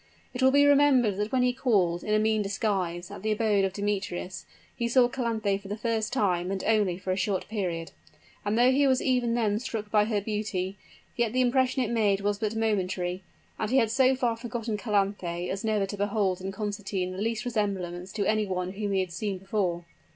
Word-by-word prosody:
It 250 - -4
will 260 - +6
be 285 +2 +5
remembered 275 -8 +4
that 210 +1 -2
when 255 -1 +2
he 250 0 +2
called, 195 -10 +1
in 215 - +1
a - - +5
mean 215 0 +2
disguise, 195 -4 -2
at - - -8
the 215 +1 -1
abode 215 -2 +2
of 195 - +1
Demetrius, 195 -2 -3 0.3
he 235 - -1
saw 245 +1 +5
Calanthe 220 -5 -1
for 195 - -11
the 205 +2 -4
first 225 0 -1
time, 180 -7 +1
and 195 -1 -3
only 210 -5 +2
for 185 0 -4
a - - +1
short 190 0 -1
period; 180 -6 -3 0.5
and 205 +2 0
though 245 +2 +5
he 280 +1 +3
was 260 -1 +3
even 245 -3 +1
then 215 -3 +1
struck 220 -4 -5
by 210 -1 +4
her 215 -1 0
beauty, 205 -2 -3 0.4
yet 235 -2 0
the 255 - +2
impression 255 +1 +2
it 235 - -3
made 205 -4 +2
was 205 0 0
but 215 +1 -2
momentary: 185 -4 -1 0.4
and 215 - -1
he 260 - +3
had 225 -4 +3
so 260 +2 +4
far 245 -3 0
forgotten 230 -1 -4
Calanthe 195 -5 -1
as 195 +3 -4
never 215 -2 +1
to 205 +1 -6
behold 200 -2 0
in 190 +1 -4
Constantine 200 -2 -3
the 185 +2 -5
least 230 +2 -1
resemblance 190 -6 -2
to 205 -2 -1
any 215 0 +1
one 180 -1 -2
whom 200 0 -3
he 190 - +2
had 185 -2 -4
seen 195 +2 -3
before. 185 -3 -2
210 Hz, 215 wpm, -27 LUFS, 190-230 Hz, 0.5 s, will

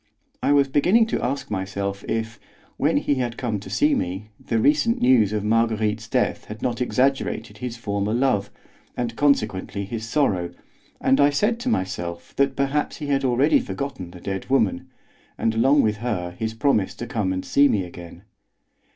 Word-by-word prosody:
I - - +2
was 140 -1 +4
beginning 180 - +4
to - - 0
ask 135 0 -3
myself 100 0 -3
if, 115 -1 -3 0.4
when - - +2
he - - +1
had 120 -1 -3
come 115 -5 -2
to 100 - -10
see 295 +1 +2
me, 100 - -3
the 115 - -1
recent 150 - +3
news 120 -5 +4
of 105 -1 -1
Marguerite's 110 0 +1
death - - 0
had 105 0 -8
not 120 -1 -1
exaggerated 125 -4 0
his 120 -1 -5
former 100 -2 -2
love, 115 -5 +1 0.5
and 120 -2 -2
consequently 105 -8 0
his 115 +2 -5
sorrow, 90 - 0 0.4
and 135 +1 +3
I 140 - +6
said 210 +11 +1
to 250 - -2
myself 90 - -3
that 140 -1 +2
perhaps 140 +2 -1
he 150 - -6
had 135 -1 +1
already 135 - +3
forgotten 140 - -5
the 90 - -12
dead 95 +3 -4
woman, 110 -9 +1 0.5
and 115 - 0
along 135 +6 +4
with 105 -1 +1
her 100 -7 -3
his 110 +5 -4
promise 110 -6 +1
to 120 - -6
come 110 -5 -1
and 95 0 -3
see 145 +1 +4
me 105 -8 +1
again. 85 0 -11
115 Hz, 175 wpm, -23 LUFS, 100-135 Hz, 0.5 s, I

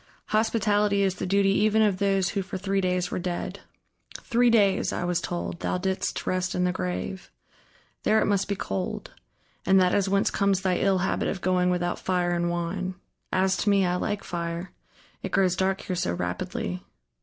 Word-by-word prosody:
"Hospitality 210 -2 +2
is 190 -1 +2
the - - -3
duty 195 +1 +3
even 215 +2 +3
of 205 -3 +2
those 195 -2 +2
who 200 - -1
for 190 0 -5
three 195 +1 0
days 180 -1 0
were - - -2
dead. 175 -1 -4 0.6
Three 240 +1 +3
days, 205 -4 +3
I - - -2
was 175 0 0
told, 175 0 -4
thou - - -1
didst 190 +1 -2
rest 185 0 -1
in 180 - +1
the 180 - +2
grave. 185 +1 -4 0.7
There 220 - +3
it - - +2
must 200 -1 +1
be 200 - -1
cold... 95 - -4 0.5
and 190 +1 +5
that 180 -1 +3
is 200 -1 +2
whence 200 0 +2
comes 200 -1 +1
thy 185 -2 +1
ill 195 -1 +2
habit 190 +1 0
of 195 - -2
going 180 0 +2
without 175 -1 -1
fire 180 -1 0
and 175 0 0
wine. 180 +2 -2 0.4
As 190 0 +2
to 210 - +1
me, 200 -2 +4
I 180 0 +1
like 205 +2 -2
fire; 170 +1 -4 0.5
it - - -5
grows 185 -2 +3
dark 190 0 0
here 185 - -3
so 90 - -1
rapidly.... 90 0 -3
190 Hz, 190 wpm, -26 LUFS, 180-200 Hz, 0.7 s, and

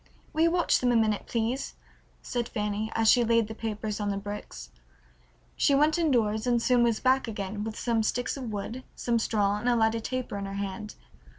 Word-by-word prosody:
"Will 315 - 0
you 335 - +5
watch 345 0 +2
them 250 -1 +2
a - - +2
minute, 215 -2 +1
please?" 235 +3 -2 0.5
said 240 -2 -3
Fanny, 210 -1 -2
as 225 0 +2
she 245 +2 +6
laid 230 -1 +3
the 220 - -6
papers 215 -1 -4
on 205 -1 -1
the 200 - -1
bricks. 205 +1 -7 0.8
She 280 - +3
went 300 +4 +3
indoors 235 -8 +1
and 240 -1 +3
soon 245 +1 +3
was 235 -2 +2
back 260 -1 +2
again, 205 -1 -4
with 220 0 -5
some 230 -2 +1
sticks 240 +3 -1
of 255 -5 -5
wood, 220 +5 -5
some 235 -1 0
straw, 205 -2 +1
and 240 +3 0
a 240 - +3
lighted 225 0 +1
taper 255 -5 -3
in 200 - -4
her 195 - -6
hand. 200 +2 -5
225 Hz, 205 wpm, -28 LUFS, 210-245 Hz, 0.8 s, she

